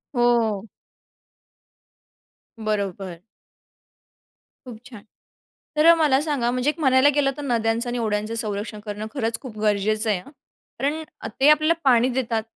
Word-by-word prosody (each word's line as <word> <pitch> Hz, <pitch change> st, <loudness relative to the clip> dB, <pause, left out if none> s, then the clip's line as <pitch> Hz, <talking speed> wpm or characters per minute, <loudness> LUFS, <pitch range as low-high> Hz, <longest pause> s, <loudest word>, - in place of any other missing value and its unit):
हो. 230 Hz, -4 st, +1 dB, 1.9 s
बरोबर. 200 Hz, -5 st, -3 dB, 1.5 s
खूप 230 Hz, -3 st, -10 dB
छान. 230 Hz, -5 st, -12 dB, 0.7 s
तर 305 Hz, +1 st, +3 dB
अ, 335 Hz, -, +9 dB
मला 295 Hz, -5 st, +3 dB
सांगा? 275 Hz, -6 st, -1 dB
म्हणजे 255 Hz, +3 st, 0 dB
एक 315 Hz, -, -4 dB
म्हणायला 265 Hz, 0 st, +4 dB
गेलं 275 Hz, -2 st, +2 dB
तर -, -, -5 dB
नद्यांचं 230 Hz, -1 st, 0 dB
आणि 245 Hz, -, -3 dB
ओढयांचं 215 Hz, 0 st, -2 dB
संरक्षण 210 Hz, -1 st, -4 dB
करणं 210 Hz, +1 st, -5 dB
खरंच 230 Hz, -4 st, -2 dB
खूप 235 Hz, -6 st, -10 dB
गरजेचं 215 Hz, +1 st, +1 dB
आहे 195 Hz, -4 st, +1 dB
हं. 275 Hz, -, -15 dB, 0.5 s
कारण 300 Hz, +3 st, -1 dB, 0.2 s
अ, -, -, -5 dB
ते 290 Hz, -, +7 dB
आपल्याला 310 Hz, +2 st, +4 dB
पाणी 250 Hz, -1 st, +4 dB
देतात. 230 Hz, -3 st, -2 dB
235 Hz, 140 wpm, -23 LUFS, 215-275 Hz, 1.9 s, अ